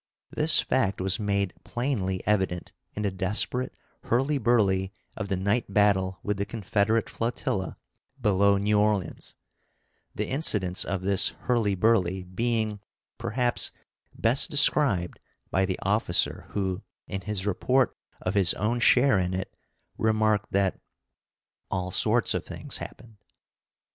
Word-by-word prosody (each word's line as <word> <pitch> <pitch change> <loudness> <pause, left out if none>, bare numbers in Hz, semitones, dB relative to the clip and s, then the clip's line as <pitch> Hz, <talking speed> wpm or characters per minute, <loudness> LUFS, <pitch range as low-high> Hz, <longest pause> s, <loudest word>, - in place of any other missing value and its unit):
This 155 +1 +4
fact 105 -7 0
was 95 +2 +1
made 100 -3 -1
plainly 115 -7 -2
evident 95 -4 0 0.2
in 105 - -3
the 100 - 0
desperate 105 +7 0 0.3
hurly 135 +5 +1
burly 100 -5 +2 0.2
of 110 - -4
the 95 - -1
night 100 +3 -1
battle 95 -2 +2
with 105 -1 -1
the 100 - -1
Confederate 110 +1 0
flotilla 115 -4 -3 0.4
below 100 -3 +3
New 105 +1 +2
Orleans 105 -3 -1 0.8
the - - -2
incidents 105 - +2
of 95 0 -3
this 100 0 +3
hurly 115 -5 +1
burly 95 -3 +2
being, 110 +2 -2 0.4
perhaps, 125 -2 0 0.5
best 125 +9 +2
described 140 - +2 0.3
by 95 +1 +2
the 95 - -2
officer 100 -3 0
who, 95 -1 -2 0.2
in 95 - -5
his 100 0 -2
report 125 +6 +1 0.3
of 90 - -2
his 95 -4 +3
own 115 +5 -1
share 125 -2 +4
in 90 0 -1
it, 95 - -5 0.4
remarked 110 -2 +1
that 100 -1 +1 0.9
"all 90 -1 -2
sorts - - +2
of - - -2
things - - -7
happened." 115 -2 -10
105 Hz, 130 wpm, -26 LUFS, 95-115 Hz, 0.9 s, This